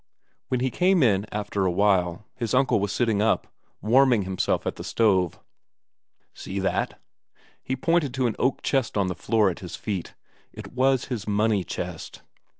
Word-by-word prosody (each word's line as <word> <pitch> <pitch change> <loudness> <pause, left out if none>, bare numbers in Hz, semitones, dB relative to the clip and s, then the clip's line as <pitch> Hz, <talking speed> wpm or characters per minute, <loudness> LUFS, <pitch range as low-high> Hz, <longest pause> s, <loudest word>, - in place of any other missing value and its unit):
When 125 -1 -1
he 130 0 0
came 180 0 +3
in 105 -3 +2
after 105 -1 -2
a 95 - +2
while, 95 -1 +1
his 120 -1 -2
uncle 130 -4 +3
was 100 0 -1
sitting 110 -4 +1
up, 110 - +2 0.4
warming 125 -1 +4
himself 95 0 -1
at - - -2
the - - -7
stove. 95 -7 +1 0.9
"See 95 - -7
that?" 95 0 -1 0.6
He 130 - -3
pointed 165 +1 +1
to 130 -1 0
an 115 - 0
oak 130 - 0
chest 135 -6 0
on 95 -2 +1
the - - -1
floor 105 +1 +2
at - - -9
his - - -7
feet. 95 -5 -5 0.4
It - - -10
was 130 0 +2
his 115 -6 -5
money 105 -1 +1
chest. - - -6
110 Hz, 170 wpm, -25 LUFS, 100-130 Hz, 0.9 s, warming